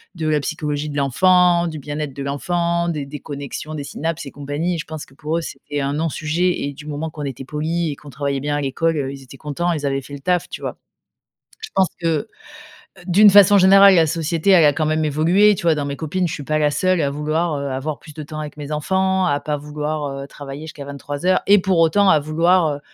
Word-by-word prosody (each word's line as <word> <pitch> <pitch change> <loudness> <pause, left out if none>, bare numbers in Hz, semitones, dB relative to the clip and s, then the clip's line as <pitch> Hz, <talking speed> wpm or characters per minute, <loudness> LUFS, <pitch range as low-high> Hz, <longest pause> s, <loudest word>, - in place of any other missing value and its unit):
de 160 -2 -3
la 155 -1 +2
psychologie 150 -1 -3
de 145 - -5
l'enfant, 175 +5 +3
du 155 -2 -5
bien-être 145 0 -5
de 140 +1 -6
l'enfant, 170 +4 -1
des 150 -4 -3
des 145 +1 -8
connexions, 145 +1 -6
des 145 - -4
synapses 160 +1 -4
et - - -8
compagnies. 145 +5 -3
Je 165 - -5
pense 155 -1 -7
que - - -21
pour 155 +3 -2
eux, - - -1
c'était 145 -1 -6
un 140 +1 -1
non-sujet 160 +3 -1
et 140 - -4
du 150 - -12
moment 150 +1 -4
qu'on 150 -1 -8
était 135 -1 -6
poli 160 +4 -2
et 145 - -4
qu'on 145 - -14
travaillait 140 +1 -2
bien 145 +1 -1
à 145 - -2
l'école, 165 +4 0
heu, 135 -2 -2
ils 135 -1 -10
étaient 135 +1 -13
contents, 160 +4 -2
ils 150 -2 -3
avaient 135 0 -1
fait 140 +2 -12
le 140 - -6
taf, 180 +4 0
tu - - -7
vois? - - -5 0.8
Je 445 - -7
pense 190 -2 +3
que, 165 +5 -1 0.8
d'une 200 +4 +6
façon 205 0 +7
générale, 195 +1 +7
la 165 -3 +5
société, 165 +3 0
elle 180 -4 +7
a 145 - +6
quand 155 +2 -1
même 155 0 +1
évolué, 175 +8 +4
tu - - -6
vois? 165 -2 +4
Dans 145 - -2
mes 140 0 -4
copines, 170 +5 -1
je 165 - -4
suis 145 - -5
pas 155 +2 0
la 150 -1 +2
seule 185 +4 +1
à 140 - 0
vouloir, 155 +4 -1
heu, 140 - -4
avoir 140 +3 -3
plus 150 - -14
de 155 - -7
temps 155 +1 -7
avec 150 0 -7
mes 145 0 -7
enfants, 190 +4 +1
à 145 -4 +1
pas 150 0 -2
vouloir, 150 +1 -4 0.2
heu, - - -7
travailler 140 +1 -9
jusqu'à 150 -3 -9
23:00 145 +5 -1
et 205 +1 +6
pour 185 -1 +1
autant 180 +5 +4
à 155 - +6
vouloir, 165 +3 +2
heu, 145 - -12
155 Hz, 245 wpm, -20 LUFS, 145-170 Hz, 0.8 s, façon